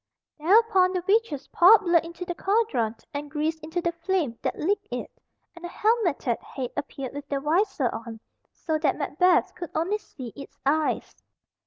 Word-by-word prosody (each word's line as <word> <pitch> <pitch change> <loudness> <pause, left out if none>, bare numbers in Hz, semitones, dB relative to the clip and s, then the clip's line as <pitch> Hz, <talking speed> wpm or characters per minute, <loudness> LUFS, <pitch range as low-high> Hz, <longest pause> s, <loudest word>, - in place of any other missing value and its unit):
Thereupon 380 +2 +4
the 365 -1 -2
witches 395 -10 +1
poured 390 +6 +7
blood 345 -4 +3
into 340 +2 -7
the 350 - -3
cauldron 385 - 0 0.2
and 290 +1 -5
grease 310 +2 -1
into 320 +3 -3
the 340 - +1
flame 335 -6 -1
that - - -2
licked 400 +6 -1
it, - - -5 0.4
and 345 - -13
a - - -3
helmeted 355 - 0
head 255 -3 -6
appeared 270 -3 -5
with 285 0 -8
the 280 - -1
visor 310 - +1
on, 225 0 -7 0.3
so 315 -2 -2
that 300 -3 +1
Macbeth 335 +5 +2
could 345 -3 -7
only 370 +7 0
see 255 - -10
its 280 0 -11
eyes. 305 +2 0
330 Hz, 170 wpm, -26 LUFS, 285-370 Hz, 0.4 s, poured